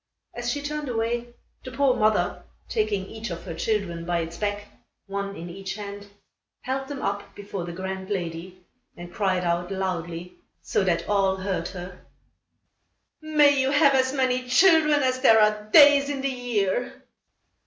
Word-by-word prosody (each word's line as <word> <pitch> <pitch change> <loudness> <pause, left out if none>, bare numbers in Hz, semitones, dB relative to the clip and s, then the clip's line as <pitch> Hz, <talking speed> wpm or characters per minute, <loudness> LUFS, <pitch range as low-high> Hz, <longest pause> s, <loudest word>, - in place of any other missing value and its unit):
As 240 0 -4
she 285 +3 -2
turned 300 -1 -4
away, 235 +1 -1 0.4
the 255 - -7
poor 265 0 +2
mother, 215 -6 +1 0.3
taking 210 -3 -1
each 220 +2 -7
of 170 -1 -6
her 170 - -6
children 175 -2 -2
by 170 0 -1
its 165 +1 -6
back, 205 +2 -2 0.4
one 200 0 -4
in 170 - -7
each 190 +2 -6
hand, 205 -1 -8 0.5
held 270 +1 -3
them 280 -1 -6
up 200 0 -3
before 200 -3 -6
the 175 - -6
grand 190 +2 -5
lady 180 -1 -5 0.3
and 175 0 -10
cried 190 -3 0
out 175 +1 -1
loudly, 180 -2 -4 0.2
so - - -1
that 170 -3 0
all 195 -2 +2
heard 190 0 -3
her: 180 -1 -9 1.2
"May 295 -2 +4
you 265 - +1
have 290 0 +4
as 260 -1 +2
many 255 -2 0
children 305 -1 +5
as 255 0 0
there 225 -4 +6
are 210 0 +2
days 285 +1 +7
in 280 -2 -3
the 275 - 0
year." 245 -3 -2
205 Hz, 165 wpm, -25 LUFS, 185-260 Hz, 1.2 s, days